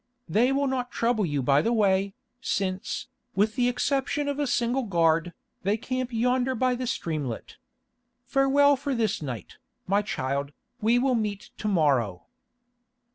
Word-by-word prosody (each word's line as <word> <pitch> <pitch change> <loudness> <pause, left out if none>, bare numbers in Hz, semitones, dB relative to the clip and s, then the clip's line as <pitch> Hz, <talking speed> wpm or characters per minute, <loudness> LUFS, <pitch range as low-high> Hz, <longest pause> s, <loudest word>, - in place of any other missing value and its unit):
They 240 +5 +3
will 280 +1 +1
not 255 -2 -1
trouble 230 -6 +1
you 145 -3 -1
by 140 +3 +4
the 230 - 0
way, 195 -3 +2 0.3
since, 190 -5 -2 0.3
with 210 +3 +2
the 245 -1 +2
exception 275 +3 0
of 285 0 -2
a 290 - +1
single 245 +2 +1
guard, 170 -5 +2 0.3
they 200 +3 +1
camp 255 +1 -3
yonder 250 +2 +1
by 255 +1 +2
the 250 0 -3
streamlet. 150 - -3 0.7
Farewell 280 +1 +4
for 275 0 -3
this 220 -7 0
night, 125 - -6 0.3
my 200 +2 +2
child; 140 -6 -3 0.3
we 225 +3 +4
will 260 +1 +2
meet 210 -4 -2
to 215 - -2
morrow." 135 - +2
220 Hz, 150 wpm, -26 LUFS, 175-255 Hz, 0.7 s, by